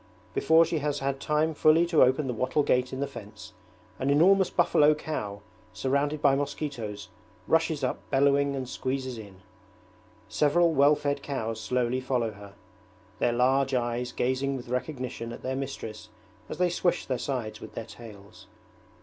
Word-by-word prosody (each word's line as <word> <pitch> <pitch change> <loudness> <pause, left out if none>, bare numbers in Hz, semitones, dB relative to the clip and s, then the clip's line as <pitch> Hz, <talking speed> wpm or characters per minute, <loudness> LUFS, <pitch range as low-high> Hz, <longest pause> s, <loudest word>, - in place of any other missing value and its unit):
Before 165 +1 +5
she 165 -1 -1
has 145 0 -1
had 135 -1 -2
time 155 +2 0
fully 155 +3 +4
to 170 -2 +3
open 130 +3 +4
the 125 - -2
wattle 130 +6 0
gate 125 -2 +1
in 130 - -4
the - - +1
fence, 110 -6 -11 0.5
an 135 - -1
enormous 180 +6 +5
buffalo 155 -3 +4
cow 105 -10 -5 0.3
surrounded 145 +3 -1
by 140 -2 +5
mosquitoes 120 -9 -4 0.4
rushes 160 -3 +1
up 125 - -1
bellowing 140 +1 +3
and 130 -2 -4
squeezes 130 -1 -3
in. 100 -4 -12 0.9
Several 150 +9 +2
well 145 +1 +5
fed 145 -1 -2
cows 115 -6 -4
slowly 125 +2 0
follow 125 -3 -1
her, 100 -1 -13 0.6
their 120 - +2
large 130 +2 +2
eyes 120 0 -1
gazing 130 +2 -1
with 120 -2 -10
recognition 125 -2 -4
at 120 - -9
their 130 +1 -2
mistress 115 -6 -6 0.4
as - - -5
they 180 0 +2
swish 175 0 0
their 130 -2 -2
sides 115 -6 -4
with - - -10
their 115 - -5
tails. 110 -2 -13
135 Hz, 160 wpm, -27 LUFS, 120-145 Hz, 0.9 s, Before